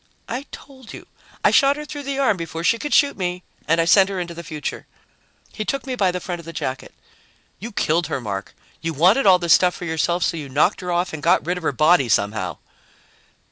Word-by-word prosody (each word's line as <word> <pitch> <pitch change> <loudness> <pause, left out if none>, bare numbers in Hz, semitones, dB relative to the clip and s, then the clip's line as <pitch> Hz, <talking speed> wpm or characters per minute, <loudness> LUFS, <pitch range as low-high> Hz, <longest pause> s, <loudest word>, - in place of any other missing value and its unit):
"I 255 +5 -5
told 260 -4 -12
you. - - -10 0.4
I - - +5
shot 280 0 +4
her 300 - -6
through 290 -1 -7
the 275 - -2
arm 270 -6 +2
before 165 -1 -6
she 230 +6 +2
could 295 - -5
shoot 285 -1 +4
me 180 -1 -3 0.2
and 165 +1 +2
I 165 - +3
sent 190 +3 +5
her 195 -2 -3
into 175 -1 -5
the 170 0 -8
future." 155 -2 -6 0.7
He 215 - -4
took 275 +5 -3
me 260 - -4
by 200 -7 +1
the 180 0 -3
front 175 -1 -5
of 170 - -12
the 165 - -7
jacket. 130 -4 -5 0.7
"You 230 +4 -7
killed 170 -4 0
her, 155 - -3
Mark. 100 -4 -6 0.3
You 165 0 -3
wanted 190 - +4
all 185 -1 +7
this 170 -2 +3
stuff 180 -1 +4
for 180 - -7
yourself, 170 +2 0
so 165 - 0
you 145 -3 -7
knocked 150 +10 +1
her 180 -1 -4
off 175 0 -1
and 155 - -6
got 170 +2 +2
rid 180 +2 -1
of - - -15
her - - +1
body 155 -1 +3
somehow." 100 -3 0
175 Hz, 235 wpm, -21 LUFS, 160-205 Hz, 0.7 s, all